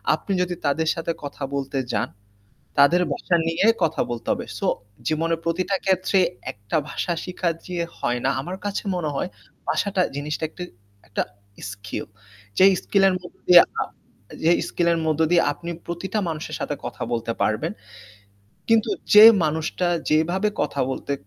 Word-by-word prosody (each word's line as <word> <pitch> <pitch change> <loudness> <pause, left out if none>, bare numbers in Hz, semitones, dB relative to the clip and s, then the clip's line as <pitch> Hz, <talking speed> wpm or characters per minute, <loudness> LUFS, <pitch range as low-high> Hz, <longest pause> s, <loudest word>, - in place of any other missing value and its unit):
আপনি 195 - -7
যদি 180 0 -1
তাদের 155 +3 +1
সাথে 165 0 -2
কথা 145 0 -6
বলতে 140 0 -3 0.2
যান, 105 - 0 0.7
তাদের 145 +6 +6
ভাষা 175 - 0
নিয়ে 165 +4 +1 0.2
কথা 160 -1 +1
বলতে 120 -1 -5
হবে। - - -2
সো - - -1 0.4
জীবনের 165 +1 0
প্রতিটা 180 +4 0
ক্ষেত্রে 190 0 +2 0.3
একটা 100 +8 -3
ভাষা 175 - -2
শিখা 180 -1 -2 0.2
যে 180 -1 -5 0.2
হয় 120 0 0
না। - - +4
আমার 180 +6 -6
কাছে 205 0 -2
মনে 165 -4 -1
হয় 180 - -2 0.4
ভাষা 200 - +1
টা 185 - +4
জিনিসটা 150 +2 -3
একটা 180 - -8 0.4
একটা 100 - -1 0.5
স্কিল। 100 -2 -6 0.5
যে - - +6 0.2
স্কিল 200 -1 +2
এর - - 0
মধ্যে 175 - -14
দিয়ে 175 -1 +11 0.8
যে 165 - +5 0.2
স্কিল 170 - 0
এর 165 - 0
মধ্য 155 -1 0
দিয়ে 175 -1 +5
আপনি 170 +4 -8 0.2
প্রতিটা 180 +5 -3
মানুষের 155 -1 -4
সাথে - - -2
কথা - - -7
বলতে 115 0 -1
পারবেন। 110 -1 0 1.0
কিন্তু 225 -1 +3 0.2
যে 210 +1 +11 0.2
মানুষটা 160 +3 -1 0.2
যেভাবে 175 +7 +2
কথা 140 - -2
বলতে 140 - -3
165 Hz, 160 wpm, -23 LUFS, 145-180 Hz, 1.0 s, দিয়ে